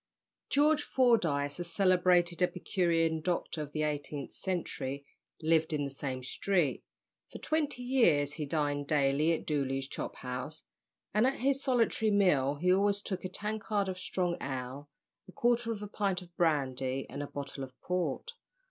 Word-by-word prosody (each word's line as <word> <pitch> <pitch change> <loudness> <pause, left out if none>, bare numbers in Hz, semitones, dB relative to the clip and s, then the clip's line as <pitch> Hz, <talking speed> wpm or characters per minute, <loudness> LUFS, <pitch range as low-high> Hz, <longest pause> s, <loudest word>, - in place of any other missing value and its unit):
George 295 +1 +4
Fordyce, 175 - +2
a - - -1
celebrated 180 0 +3
epicurean 170 -3 +1
doctor 175 -1 -2
of 145 -1 -6
the 155 0 -1
eighteenth 145 -1 -3
century, 140 -7 -3 0.4
lived 160 0 +3
in 145 -1 0
the 140 - -5
same 130 -2 -4
street. 170 +1 0 0.5
For - - -7
twenty 295 -5 -1
years 190 - +3
he 150 -2 -4
dined 145 -1 0
daily 145 +2 +3
at 160 - -3
Dolly's 135 -3 -1
Chop - - -5
house, 125 +5 -5 0.5
and 215 +5 +4
at 270 - 0
his 275 +1 +2
solitary 235 -4 +2
meal 175 -10 +3
he 180 +5 +3
always 200 +1 +2
took 190 -2 -4
a - - -2
tankard 210 0 -2
of 185 -1 -4
strong 180 -1 -1
ale, 135 +1 -5 0.4
a - - -11
quarter 240 +2 +1
of 210 -2 -4
a - - -4
pint 195 -3 -1
of 175 -1 -19
brandy, 135 -5 0
and 140 - -6
a 145 - -4
bottle 140 -1 -6
of 130 -2 -10
port. 180 - -2
170 Hz, 160 wpm, -31 LUFS, 145-200 Hz, 0.5 s, George